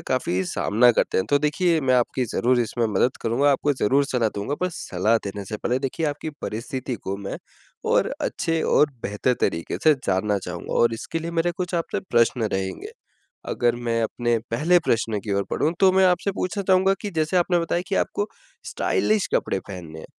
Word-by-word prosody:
काफ़ी 95 -7 0
सामना 115 +6 +3
करते - - +1
हैं। 95 - 0
तो 145 - +5
देखिए 160 +3 +1
मैं 130 -2 +2
आपकी 125 +1 +1
ज़रूर 125 0 +2
इसमें 120 0 0
मदद 125 - +2
करूँगा 130 +6 +2
आपको 145 +2 +1
ज़रूर 135 +2 +2
सलाह 125 -6 0
दूँगा। 105 +8 -2
पर 180 - +1
सलाह 105 - 0
देने 100 0 -6
से 105 +2 -5
पहले 125 +4 -1
देखिए 140 +4 -2
आपकी 150 +2 -3
परिस्थिति 125 +3 -4
को 100 -3 -5
मैं 100 -1 -6 0.5
और - - +2
अच्छे 165 -1 -1
और 150 - +3
बेहतर 105 +5 0
तरीके 85 - -1
से 155 - +7
जानना 100 +2 +1
चाहूँगा 90 -2 -6
और 115 -1 +4
इसके 165 +8 -4
लिए 165 +1 -5
मेरे 170 +1 +1
कुछ 180 -1 -3
आपसे 170 - -1
प्रश्न 120 0 +3
रहेंगे। 95 0 -3 0.6
अगर 120 -1 +1
मैं 115 -1 -1
अपने 120 +1 0
पहले 165 +9 +3
प्रश्न 115 -2 +1
की 105 - -2
ओर 100 0 +1
बढ़ूँ 155 +3 +1
तो 190 -1 +6
मैं 190 0 +4
आपसे 180 +2 +2
पूछना 195 +1 -3
चाहूँगा 190 +1 +4
कि 205 - -3
जैसे 155 +3 +1
आपने 175 0 +2
बताया 170 +1 -1
कि 195 - -1
आपको 205 - 0 0.4
स्टाइलिश 215 -2 0
कपड़े 95 - +1
पहनने 85 -5 -8
हैं, - - -9
125 Hz, 195 wpm, -24 LUFS, 110-165 Hz, 0.6 s, से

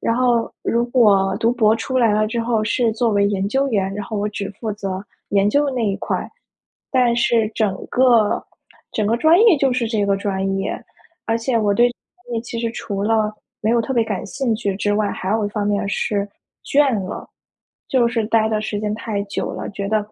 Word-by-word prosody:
然 230 - 0
后 245 -2 +2
如 235 +1 +1
果 200 -6 +3
读 230 +1 +3
博 220 -3 +3
出 260 +3 -2
来 230 -3 +4
了 215 0 +2
之 235 +1 -2
后 230 -2 0
是 225 +1 +1
作 230 0 +1
为 200 -1 +3
研 200 -1 -1
究 270 +5 +1
员， 195 -4 0
然 205 -1 -4
后 220 - -4
我 205 +1 -1
只 205 -1 -4
负 220 -3 -2
责 195 -1 -5 0.3
研 200 0 +3
究 285 +5 +2
的 275 - -1
那 240 -3 -1
一 195 -2 0
块。 - - -3 0.6
但 250 -2 +3
是 235 -2 +2
整 205 -4 0
个 240 -5 +3 0.5
整 215 -2 0
个 230 +2 +2
专 320 +6 +5
业 445 -8 +6
就 270 -2 +2
是 245 -2 -1
这 215 -3 0
个 200 0 +2
专 195 -1 -1
业， 195 - -2 0.6
而 225 0 +1
且 230 0 0
我 205 -2 +2
对 240 +3 +5
专 240 0 -12
业 225 - -1
其 230 0 -6
实 230 -1 -1
除 200 -3 -4
了 215 0 +1 0.3
没 215 - +1
有 235 0 +3
特 265 - -3
别 235 - +3
感 205 -4 -3
兴 235 +2 -1
趣 205 -4 -2
之 205 +1 0
外， 210 -1 +1
还 185 - -4
有 215 -1 +1
一 - - -1
方 205 -1 -2
面 205 -1 +1
儿 - - -3
是， 200 0 -1 0.4
倦 280 -3 +3
了， - - -7 0.6
就 245 -3 +3
是 230 -2 -1
呆 220 -1 +3
的 215 -1 0
时 210 -1 -3
间 210 0 -2
太 215 -2 -3
久 200 - -3
了， - - -5
觉 200 0 -4
得， 215 +1 +2
220 Hz, 245 characters per minute, -20 LUFS, 205-235 Hz, 0.6 s, 业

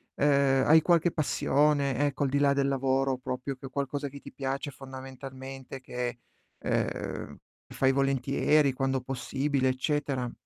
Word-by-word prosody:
ehm, 140 -2 +3
hai 160 +2 +7
qualche 170 +1 +3
passione 145 -3 +2
ecco, 145 0 -1
al 135 - +1
di 140 - +1
là 140 -1 +4
del 140 0 +1
lavoro 135 0 +1
proprio 130 +2 -4
che 135 - -11
è - - -6
qualcosa 140 +1 -2
che 140 +1 -9
ti - - -10
piace 135 +1 -3
fondamentalmente, 130 0 -9
che 125 -1 -4 0.4
ehm, - - -2 0.3
fai 135 0 +2
volentieri 135 +2 +2
quando 135 0 -1
possibile 135 +1 -1
eccetera? 130 -1 -1
135 Hz, 145 wpm, -29 LUFS, 130-140 Hz, 0.4 s, hai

